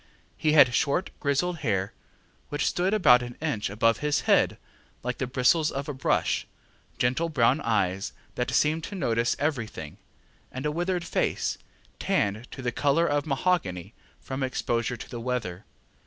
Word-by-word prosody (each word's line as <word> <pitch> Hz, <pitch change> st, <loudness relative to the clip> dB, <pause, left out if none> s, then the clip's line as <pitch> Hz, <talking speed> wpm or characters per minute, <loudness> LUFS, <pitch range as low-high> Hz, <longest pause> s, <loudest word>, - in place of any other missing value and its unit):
He 155 Hz, -1 st, +1 dB
had 140 Hz, -5 st, +7 dB
short 145 Hz, +9 st, +1 dB
grizzled 160 Hz, +5 st, 0 dB
hair, 100 Hz, -7 st, -1 dB, 0.6 s
which 145 Hz, 0 st, -1 dB
stood 180 Hz, +2 st, +1 dB
about 150 Hz, -13 st, +6 dB
an 120 Hz, 0 st, -7 dB
inch 135 Hz, -11 st, -2 dB
above 115 Hz, +2 st, +2 dB
his 150 Hz, 0 st, +1 dB
head -, -, +3 dB, 0.5 s
like 125 Hz, +1 st, -3 dB
the 130 Hz, -, -1 dB
bristles 130 Hz, +5 st, +3 dB
of 140 Hz, +1 st, -4 dB
a 150 Hz, -, -3 dB
brush, 130 Hz, -, 0 dB, 0.5 s
gentle 130 Hz, +8 st, +1 dB
brown 135 Hz, -1 st, +3 dB
eyes, 95 Hz, -4 st, 0 dB, 0.2 s
that 125 Hz, -, -2 dB
seemed 155 Hz, +2 st, +2 dB
to 205 Hz, -, -7 dB
notice 120 Hz, -8 st, +1 dB
everything, 115 Hz, -, -3 dB, 0.5 s
and 130 Hz, +3 st, -5 dB
a 150 Hz, -, +1 dB
withered 175 Hz, +2 st, -1 dB
face, -, -, -1 dB, 0.4 s
tanned 105 Hz, +4 st, 0 dB
to 130 Hz, -, -8 dB
the 120 Hz, -, 0 dB
colour 145 Hz, +6 st, +2 dB
of 145 Hz, -1 st, 0 dB
mahogany 130 Hz, -, -1 dB, 0.3 s
from 135 Hz, +1 st, -5 dB
exposure 120 Hz, -2 st, -1 dB
to -, -, -9 dB
the 120 Hz, -2 st, -7 dB
weather. 115 Hz, -7 st, -3 dB
130 Hz, 155 wpm, -27 LUFS, 115-155 Hz, 0.6 s, had